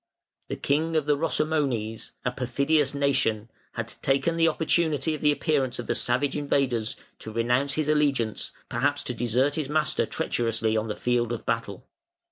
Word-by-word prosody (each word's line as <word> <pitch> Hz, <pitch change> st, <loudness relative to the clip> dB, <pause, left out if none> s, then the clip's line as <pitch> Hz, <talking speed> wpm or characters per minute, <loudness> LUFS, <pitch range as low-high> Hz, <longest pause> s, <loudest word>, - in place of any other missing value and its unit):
The -, -, -3 dB
king 160 Hz, +3 st, 0 dB
of 155 Hz, -3 st, +2 dB
the 150 Hz, -1 st, +3 dB
Rosomones, 140 Hz, -8 st, -1 dB, 0.2 s
"a 125 Hz, -, +1 dB
perfidious 140 Hz, +3 st, +1 dB
nation", 120 Hz, -6 st, +1 dB, 0.2 s
had -, -, -3 dB
taken 140 Hz, +5 st, +1 dB
the 165 Hz, 0 st, +4 dB
opportunity 160 Hz, -2 st, +1 dB
of 155 Hz, -, -5 dB
the 150 Hz, -, +4 dB
appearance 140 Hz, -4 st, 0 dB
of 120 Hz, -, -5 dB
the -, -, 0 dB
savage 130 Hz, +3 st, +1 dB
invaders 135 Hz, -6 st, 0 dB, 0.2 s
to 110 Hz, -, -7 dB
renounce 120 Hz, +5 st, +1 dB
his 155 Hz, 0 st, -1 dB
allegiance, 140 Hz, -7 st, +1 dB, 0.2 s
perhaps 145 Hz, +1 st, 0 dB
to 125 Hz, -, -3 dB
desert 125 Hz, +5 st, +1 dB
his 150 Hz, -3 st, -2 dB
master 155 Hz, 0 st, +1 dB
treacherously 115 Hz, -1 st, 0 dB
on 110 Hz, 0 st, 0 dB
the 105 Hz, -, -3 dB
field 120 Hz, -1 st, 0 dB
of 120 Hz, -, -4 dB
battle. 115 Hz, -4 st, -2 dB
135 Hz, 165 wpm, -26 LUFS, 120-150 Hz, 0.2 s, the